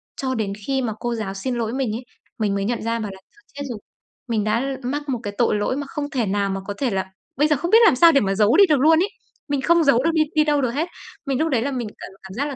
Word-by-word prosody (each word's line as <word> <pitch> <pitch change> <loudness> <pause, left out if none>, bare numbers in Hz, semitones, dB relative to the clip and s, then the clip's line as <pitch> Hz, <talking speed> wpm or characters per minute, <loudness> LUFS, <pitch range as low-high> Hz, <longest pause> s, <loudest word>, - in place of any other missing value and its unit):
Cho 260 -1 -2
đến 205 -3 -2
khi 270 -1 +1
mà 225 -4 -2
cô 240 -1 -2
giáo 215 -4 -4
xin 245 +6 -3
lỗi 230 0 -2
mình 265 -4 -1
ấy, 250 - -6 0.4
mình 205 -2 0
mới 200 0 -1
nhận 235 +2 -1
ra 230 +1 -1
bảo 210 -2 -4
là 190 - -12
"Thôi 415 - -25
chết 285 0 -6
rồi, 230 -4 -5 0.5
mình 220 -3 0
đã 220 +4 +1 0.2
mắc 285 +3 -3
một 250 - -1
cái 205 - -4
tội 235 - +2
lỗi 210 +5 0
mà 285 -1 -4
không 290 0 -4
thể 255 -6 -1
nào 200 0 0
mà 195 0 -3
có 205 - -3
thể 270 - 0
là 190 -3 -1 0.3
bây 295 - +4
giờ 305 - +3
không 345 +7 -3
biết 450 - +8
làm 320 - +6
sao 335 +5 +7
để 280 - +4
mà 195 -1 0
giấu 210 - +4
đi 400 - +8
được 295 -4 +4
luôn 320 +3 +5
ấy." 390 +4 +1 0.4
Mình 285 -2 -1
không 340 +3 +4
giấu 270 -3 +4
được 330 - +2
đi 315 - +3
đi 305 - +5
đâu 295 -1 +1
được 250 -3 0
hết. 310 +7 -1 0.4
Mình 270 -2 -1
lúc 320 +1 +1
đấy 250 -5 +1
là 280 +4 -1
mình 245 -4 -3
cảm - - -9
cảm 190 - -10
giác 275 +7 -2
là 285 - -5
255 Hz, 310 wpm, -22 LUFS, 215-290 Hz, 0.5 s, biết